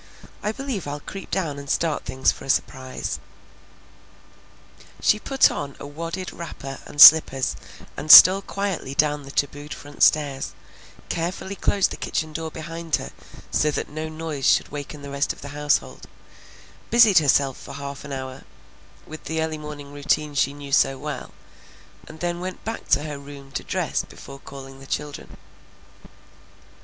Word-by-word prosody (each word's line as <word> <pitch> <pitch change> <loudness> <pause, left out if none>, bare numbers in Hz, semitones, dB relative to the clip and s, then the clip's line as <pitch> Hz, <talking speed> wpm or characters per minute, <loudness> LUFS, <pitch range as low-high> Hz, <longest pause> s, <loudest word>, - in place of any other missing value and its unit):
I 210 - -1
believe 245 - -5
I'll 145 +1 -4
creep 195 +6 -9
down 155 -7 -2
and 140 -1 -10
start 160 0 0
things 130 0 +2
for - - -11
a - - -10
surprise." 130 -1 -2 1.8
She 210 - +3
put 270 +4 +3
on 140 -1 -5
a - - -8
wadded 165 +5 -6
wrapper 135 -5 -8
and 145 - -10
slippers 140 -4 +8 0.4
and 155 - +1
stole 190 +2 +11
quietly 195 -9 -4
down 150 0 +2
the - - -11
tabooed 145 +1 -2
front 145 0 -12
stairs, 140 -3 +2 0.6
carefully 180 +3 -3
closed 200 0 +1
the - - -5
kitchen 155 -1 -3
door 160 0 -4
behind 165 +1 -3
her - - -6 0.4
so 150 - +2
that 150 - -3
no 155 +1 -5
noise 155 -3 -3
should - - +3
waken 145 0 -7
the 140 - -8
rest 140 +1 0
of - - -16
the 140 - -8
household, 145 0 -1 0.8
busied 225 -6 +7
herself 140 -3 +2
for - - -13
a - - -7
half 140 0 -7
hour 135 -1 -6 0.6
with 155 0 -10
the 160 +1 -2
early 160 -1 -2
morning 145 -2 -9
routine 145 +1 0
she 140 -1 +1
knew 145 -1 -10
so 135 -1 +3
well, - - -6 0.8
and 155 0 -12
then 175 0 -2
went 185 +1 -7
back 225 +1 -5
to 140 +2 +3
her 150 -2 -6
room 140 -1 -12
to - - -4
dress - - -1
before 140 0 -12
calling 135 -1 -11
the 135 - -13
children. 150 0 -5
150 Hz, 165 wpm, -23 LUFS, 140-165 Hz, 1.8 s, stole